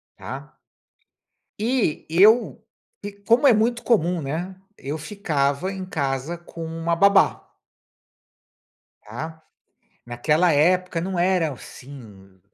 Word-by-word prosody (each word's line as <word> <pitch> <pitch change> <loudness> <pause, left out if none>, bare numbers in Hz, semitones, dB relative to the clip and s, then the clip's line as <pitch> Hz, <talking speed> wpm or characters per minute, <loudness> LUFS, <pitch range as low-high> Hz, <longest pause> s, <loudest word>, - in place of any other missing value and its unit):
tá, - - -9 1.0
e 225 - -1
eu, 205 +9 +4 0.6
como 240 +5 +4
é - - +7
muito 230 +2 +1
comum, 180 -7 +1
né, 165 +7 -4 0.2
eu 145 +4 -5
ficava 155 -1 -2
em 190 -1 -6
casa 145 -1 -3
com 170 -1 -9
uma 165 +1 -2
babá 200 +3 +3 1.5
tá. 160 +9 -8 0.6
Naquela 150 +8 +1
época, 180 +3 +2
não 185 0 -3
era 175 -3 +1
assim, 110 -9 -13
165 Hz, 100 wpm, -23 LUFS, 145-190 Hz, 1.5 s, é